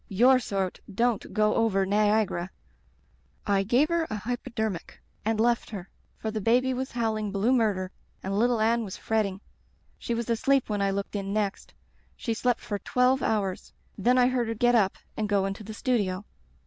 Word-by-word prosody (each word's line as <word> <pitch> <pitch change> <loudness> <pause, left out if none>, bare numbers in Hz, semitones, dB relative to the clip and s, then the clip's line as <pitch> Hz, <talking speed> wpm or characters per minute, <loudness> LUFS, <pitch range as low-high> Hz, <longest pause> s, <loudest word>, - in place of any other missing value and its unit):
Tour 250 +6 +5
sort 195 -6 -2
don't 230 +2 0
go 215 -1 +2
over 195 -4 +2
Niagara.' 205 -3 +1 1.0
"I 200 -1 +2
gave 245 - +2
her 335 -1 +1
an 215 - -4
hypodermic 220 -3 -4 0.2
and 220 0 0
left 235 +1 +2
her, 195 -4 -8 0.3
for 220 - -3
the 215 0 -3
baby 250 +5 +3
was 260 +1 -4
howling 220 -3 -1
blue 200 +5 +1
naurder 205 -7 +1 0.3
and 195 +1 -2
little 235 +2 +2
Anne 230 +2 +2
was 195 -3 -6
fretting. 205 -3 -1 0.6
She 235 - -2
was 235 0 -3
asleep 255 +3 +2
when 205 -1 0
I 200 - +2
looked 200 +1 -3
in 200 -1 -3
next. 205 -2 -2 0.4
She 230 - -2
slept 245 +1 0
for 205 -1 -4
twelve 255 +4 +2
hours. 200 -4 -1 0.2
Then 245 +5 +2
I 250 - +6
heard 250 -2 0
her 225 - -2
get 240 +2 +3
up 205 -5 +3 0.2
and 215 -1 -2
go 200 -2 +2
into 195 +2 -4
the 215 +1 -8
studio. 205 -7 0
220 Hz, 180 wpm, -27 LUFS, 200-240 Hz, 1.0 s, I